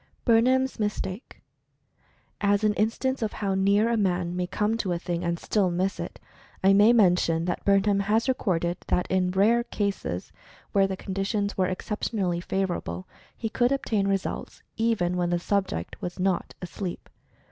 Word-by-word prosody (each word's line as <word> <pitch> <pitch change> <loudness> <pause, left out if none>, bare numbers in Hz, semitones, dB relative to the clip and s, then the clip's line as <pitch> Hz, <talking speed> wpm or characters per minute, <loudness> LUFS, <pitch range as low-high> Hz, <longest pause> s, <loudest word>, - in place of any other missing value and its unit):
bernheim's 255 +2 +3
mistake. 210 +1 -4 1.0
As 205 0 +2
an 210 -1 +3
instance 240 +5 0
of 215 -2 -1
how 200 -2 -1
near 200 +3 +3
a 235 - +1
man 180 -3 0
may 180 0 -1
come 210 +4 0
to 195 -5 -2
a - - -1
thing, 175 0 -3
and 170 0 -1
still 195 +1 +1
miss 185 +3 -1
it, - - -6 0.4
I 195 +1 +6
may 205 +3 +6
mention 180 -7 +3
that 175 - -2
Bernheim 200 0 +3
has 215 +5 +1
recorded 175 -9 0
that 180 - +1
in 185 -1 +2
rare 215 +6 +3
cases, 200 - -3 0.4
where 195 -1 +3
the 190 -1 -4
conditions 200 +2 -2
were 185 -1 +1
exceptionally 185 -1 -2
favorable, 175 - -3 0.3
he 225 - -3
could 240 +3 +1
obtain 220 -7 0
results 195 -1 -3
even 210 -6 +1
when 175 -1 0
the 175 - +1
subject 190 - -2
was 175 - -5
not 185 -1 0
asleep. 180 +1 -6
195 Hz, 160 wpm, -26 LUFS, 180-215 Hz, 1.0 s, I